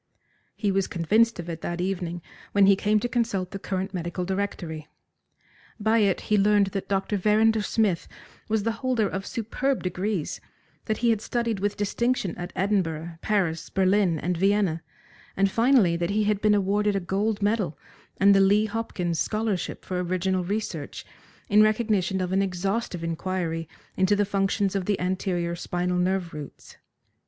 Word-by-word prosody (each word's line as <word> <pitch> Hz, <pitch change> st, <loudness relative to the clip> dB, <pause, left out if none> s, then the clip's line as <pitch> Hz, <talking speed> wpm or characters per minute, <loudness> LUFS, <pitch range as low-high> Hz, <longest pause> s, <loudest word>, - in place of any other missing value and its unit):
He 205 Hz, -3 st, 0 dB
was 195 Hz, 0 st, +1 dB
convinced 215 Hz, +6 st, +2 dB
of 175 Hz, -, -5 dB
it 165 Hz, -1 st, -5 dB
that 175 Hz, 0 st, -4 dB
evening 175 Hz, -2 st, -3 dB, 0.3 s
when 200 Hz, -1 st, +5 dB
he 195 Hz, 0 st, +6 dB
came 210 Hz, +2 st, +2 dB
to 245 Hz, -, 0 dB
consult 225 Hz, -7 st, -1 dB
the 195 Hz, -, -5 dB
current 190 Hz, 0 st, -3 dB
medical 175 Hz, 0 st, -3 dB
directory. 175 Hz, -5 st, -3 dB, 0.9 s
By 220 Hz, +2 st, +3 dB
it 200 Hz, -3 st, +2 dB
he 210 Hz, -1 st, +1 dB
learned 205 Hz, 0 st, +4 dB
that 195 Hz, -, -4 dB
Dr. 195 Hz, +1 st, 0 dB
Verrinder 215 Hz, +3 st, +3 dB
Smith 205 Hz, -4 st, 0 dB, 0.4 s
was 215 Hz, -1 st, +1 dB
the 230 Hz, -, +1 dB
holder 250 Hz, -5 st, +1 dB
of 195 Hz, 0 st, -4 dB
superb 250 Hz, +4 st, -2 dB
degrees, 185 Hz, -1 st, -2 dB, 0.4 s
that 220 Hz, -2 st, -1 dB
he 235 Hz, -, +5 dB
had 220 Hz, -2 st, 0 dB
studied 235 Hz, -3 st, -1 dB
with 205 Hz, +1 st, -1 dB
distinction 210 Hz, -2 st, 0 dB
at 175 Hz, 0 st, -6 dB
Edinburgh, 170 Hz, -4 st, -1 dB
Paris, 185 Hz, -6 st, 0 dB
Berlin, 190 Hz, -2 st, +2 dB
and 180 Hz, +4 st, -1 dB
Vienna, 195 Hz, -2 st, +1 dB, 0.6 s
and 195 Hz, 0 st, +3 dB
finally 230 Hz, -7 st, +4 dB
that 170 Hz, 0 st, -1 dB
he 210 Hz, +1 st, +1 dB
had 210 Hz, -1 st, 0 dB
been 210 Hz, -1 st, +4 dB
awarded 205 Hz, +1 st, +1 dB
a -, -, +2 dB
gold 200 Hz, +3 st, -1 dB
medal 205 Hz, -6 st, 0 dB, 0.4 s
and 200 Hz, +1 st, +6 dB
the 195 Hz, -, +5 dB
Lee 205 Hz, +2 st, +4 dB
Hopkins 200 Hz, -6 st, -2 dB
scholarship 215 Hz, -3 st, -2 dB
for 180 Hz, -1 st, -2 dB
original 185 Hz, +1 st, 0 dB
research, 180 Hz, -6 st, -4 dB, 0.4 s
in 210 Hz, +1 st, +5 dB
recognition 215 Hz, -4 st, +2 dB
of 180 Hz, 0 st, -2 dB
an 190 Hz, +1 st, +2 dB
exhaustive 195 Hz, 0 st, -2 dB
inquiry 165 Hz, -1 st, -3 dB, 0.3 s
into 190 Hz, +2 st, +3 dB
the 205 Hz, 0 st, +2 dB
functions 195 Hz, 0 st, 0 dB
of 195 Hz, -2 st, -1 dB
the 205 Hz, -1 st, 0 dB
anterior 180 Hz, -2 st, -1 dB
spinal 180 Hz, +1 st, -2 dB
nerve 180 Hz, -1 st, 0 dB
roots. 150 Hz, -2 st, -10 dB
195 Hz, 165 wpm, -26 LUFS, 180-210 Hz, 0.9 s, he